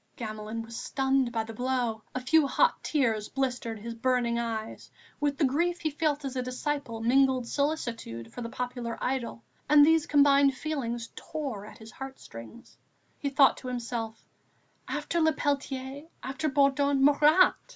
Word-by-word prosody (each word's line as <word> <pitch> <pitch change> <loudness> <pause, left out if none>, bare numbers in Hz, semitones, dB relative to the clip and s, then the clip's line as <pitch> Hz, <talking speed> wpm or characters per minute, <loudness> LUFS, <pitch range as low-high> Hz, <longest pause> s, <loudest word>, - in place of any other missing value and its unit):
Gamelin 215 0 -5
was 230 0 -10
stunned 265 0 0
by 225 -2 -1
the 225 0 -8
blow. 245 -2 -1
A 255 - -1
few 290 +3 +4
hot 485 - +2
tears 225 -8 0
blistered 250 -4 -2
his 230 +2 -6
burning 235 0 +1
eyes. 225 -2 -4 0.3
With 290 -1 0
the 300 - +3
grief 340 +6 0
he 315 - -1
felt 300 -1 -1
as 270 -1 -4
a 255 - 0
disciple 255 -2 -3
mingled 260 +1 +3
solicitude 235 - -3
for 245 - -6
the 230 - -4
popular 245 -1 -4
idol, 250 -3 -3 0.3
and 295 -1 +8
these 320 0 +3
combined 280 -1 +5
feelings 240 -6 -3
tore 265 -10 -5
at - - -12
his 220 0 -12
heart 270 0 -8
strings. 115 - -12 0.4
He 280 - -1
thought 275 0 +5
to 255 - -8
himself: 235 -2 -4 0.6
"After 340 - -1
Le 315 0 +4
Peltier, 275 0 -3 0.2
after 275 +4 -2
Bourdon, 280 0 +3
Marat!... 300 +5 +6
260 Hz, 160 wpm, -28 LUFS, 230-285 Hz, 0.6 s, and